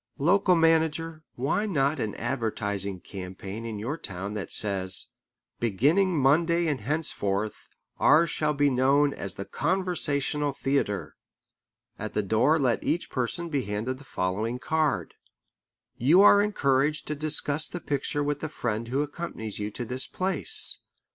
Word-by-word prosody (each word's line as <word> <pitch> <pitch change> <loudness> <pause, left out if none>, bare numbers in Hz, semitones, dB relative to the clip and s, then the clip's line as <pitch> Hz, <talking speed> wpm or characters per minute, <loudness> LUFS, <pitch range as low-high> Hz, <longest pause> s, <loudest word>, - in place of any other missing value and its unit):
Local 180 +5 +3
manager, 165 -1 +1
why 140 - 0
not 140 -5 0
an 110 -4 -3
advertising 100 -6 -2
campaign 95 +4 -7
in 110 -2 -5
your 130 +10 -4
town 95 -1 -6
that 105 -2 -5
says: 95 -2 +5 0.5
"Beginning 150 - +2
Monday 165 +5 +3
and 145 -7 -1
henceforth, 105 -7 -2 0.3
ours 160 +3 +5
shall 150 -1 0
be 145 0 +3
known 140 +3 +3
as 95 - -5
the 100 - -6
Conversational 150 - -1
Theatre"? 135 -8 -2 0.8
At - - -5
the 105 - 0
door 115 - +3
let 130 -6 0
each 175 - -1
person 155 +7 -2
be 140 -5 -1
handed 110 +6 -3
the - - -13
following 105 +1 -2
card: 155 +1 -1 0.8
"You 160 - +5
are 205 0 +7
encouraged 150 -7 +1
to 150 - -3
discuss 150 0 -2
the 175 - -6
picture 145 -1 -2
with 145 0 -1
the 155 - -4
friend 115 -5 -3
who 135 +4 0
accompanies 145 - -6
you 105 0 -3
to 120 +3 -6
this 125 +3 -3
place. 195 - +2
140 Hz, 145 wpm, -27 LUFS, 110-160 Hz, 0.8 s, are